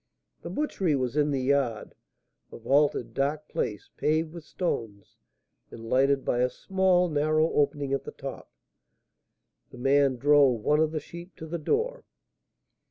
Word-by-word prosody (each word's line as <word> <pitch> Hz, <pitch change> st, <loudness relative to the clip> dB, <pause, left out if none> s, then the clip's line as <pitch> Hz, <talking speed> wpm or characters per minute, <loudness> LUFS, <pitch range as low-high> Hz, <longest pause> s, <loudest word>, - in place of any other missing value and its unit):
The -, -, -7 dB
butchery 195 Hz, -, -1 dB
was 130 Hz, -1 st, -2 dB
in 150 Hz, 0 st, +2 dB
the 135 Hz, -2 st, -1 dB
yard, 130 Hz, -5 st, 0 dB, 0.6 s
a -, -, -9 dB
vaulted, 140 Hz, +5 st, +1 dB
dark 150 Hz, +2 st, -1 dB
place, 105 Hz, -, -4 dB
paved 155 Hz, +1 st, 0 dB
with 170 Hz, -2 st, -9 dB
stones, 115 Hz, -, -4 dB, 0.5 s
and 115 Hz, 0 st, -10 dB
lighted 135 Hz, +1 st, +3 dB
by 120 Hz, -, 0 dB
a 125 Hz, 0 st, +2 dB
small, 185 Hz, +5 st, +1 dB
narrow 155 Hz, +1 st, +1 dB
opening 145 Hz, -1 st, 0 dB
at 135 Hz, -1 st, -1 dB
the -, -, -7 dB
top. 135 Hz, -1 st, -8 dB, 1.2 s
The -, -, -13 dB
man 135 Hz, +1 st, +3 dB
drove 140 Hz, -3 st, +4 dB
one 150 Hz, +7 st, +2 dB
of 155 Hz, -1 st, +2 dB
the 155 Hz, -, -2 dB
sheep 170 Hz, +4 st, -11 dB
to 160 Hz, -, -9 dB
the 170 Hz, +2 st, -4 dB
door. 470 Hz, -, -1 dB
145 Hz, 155 wpm, -27 LUFS, 130-160 Hz, 1.2 s, drove